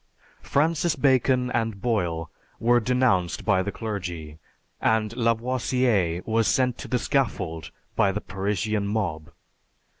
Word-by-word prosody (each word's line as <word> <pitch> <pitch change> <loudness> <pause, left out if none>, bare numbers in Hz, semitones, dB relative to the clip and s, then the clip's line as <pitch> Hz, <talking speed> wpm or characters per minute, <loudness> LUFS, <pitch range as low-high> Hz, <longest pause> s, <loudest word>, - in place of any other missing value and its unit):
Francis 160 +2 +1
Bacon 130 -2 +2
and 115 -4 -1
Boyle 85 -8 -1 0.3
were 120 +1 +4
denounced 120 -7 +1
by 95 -4 +3
the 100 - -3
clergy, 90 -9 -5 0.4
and 110 0 +1
Lavoisier 115 -6 +1
was 115 0 +1
sent 125 -2 +1
to - - -7
the 125 - +1
scaffold 95 - -1 0.3
by 100 - +3
the 100 - -2
Parisian 100 +2 -2
mob. 95 -8 -2
110 Hz, 120 wpm, -25 LUFS, 95-125 Hz, 0.4 s, were